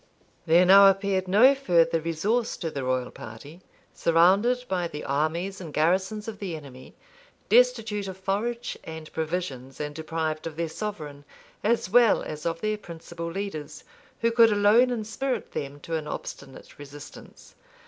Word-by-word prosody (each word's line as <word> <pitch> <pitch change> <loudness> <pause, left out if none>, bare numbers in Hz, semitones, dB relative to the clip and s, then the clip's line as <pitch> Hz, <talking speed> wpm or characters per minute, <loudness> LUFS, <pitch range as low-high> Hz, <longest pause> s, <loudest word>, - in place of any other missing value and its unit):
There 170 +3 +5
now 195 +2 +8
appeared 195 -1 0
no 220 +9 +6
further 170 -11 +2
resource 205 +9 -1
to 165 -3 -4
the 140 -2 -4
royal 130 -1 -1
party, 140 +10 -11 0.3
surrounded 195 +10 +3
by 180 -4 -1
the 150 -2 -7
armies 165 +7 -2
and 165 -4 -8
garrisons 190 +8 0
of 220 -2 -7
the 185 -5 -4
enemy, 130 -4 -12 0.5
destitute 225 -4 +3
of 190 -1 -7
forage 225 +5 -2
and 160 -1 -9
provisions, 155 -6 -4
and 150 0 -4
deprived 160 0 -3
of 160 - -7
their 165 0 -2
sovereign, 155 -8 -6 0.4
as 230 -1 +1
well 235 +3 +4
as 150 +1 -5
of 165 0 -3
their 215 0 -1
principal 170 -2 -8
leaders, 170 -4 -6 0.4
who 230 0 +2
could 230 -1 +5
alone 210 +5 +4
inspirit 240 +2 -3
them 140 0 -5
to 165 - -4
an 155 -1 -4
obstinate 135 -1 -9
resistance. 145 +1 -12
175 Hz, 150 wpm, -26 LUFS, 155-210 Hz, 0.5 s, now